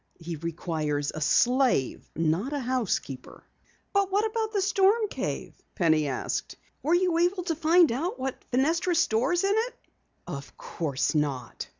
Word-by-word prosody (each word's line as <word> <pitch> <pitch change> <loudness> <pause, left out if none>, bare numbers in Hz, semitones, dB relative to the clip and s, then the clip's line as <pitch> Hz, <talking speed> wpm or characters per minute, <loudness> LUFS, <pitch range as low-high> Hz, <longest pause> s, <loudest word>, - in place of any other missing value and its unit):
He 170 0 -5
requires 155 -3 -2
a 155 - -6
slave, 245 - +2
not 165 - 0
a 290 - -1
housekeeper!" 235 - -3 0.5
"But 400 -1 +2
what 410 +3 +2
about 440 0 -1
the 415 - 0
storm 395 +3 +3
cave?" - - -4 0.2
Penny 160 -4 +3
asked. 130 -2 -3 0.3
"Were 320 +4 +2
you 350 -2 +2
able 360 +2 +1
to 335 -2 -1
find 330 0 +4
out 305 +10 -2
what 265 0 -4
Fenestra 325 +7 +1
stores 320 - +2
in 395 +1 +3
it?" 465 +2 -1 0.5
"Of 145 -5 -8
course 145 -5 -2
not. 140 -6 -2
265 Hz, 150 wpm, -27 LUFS, -, 0.5 s, find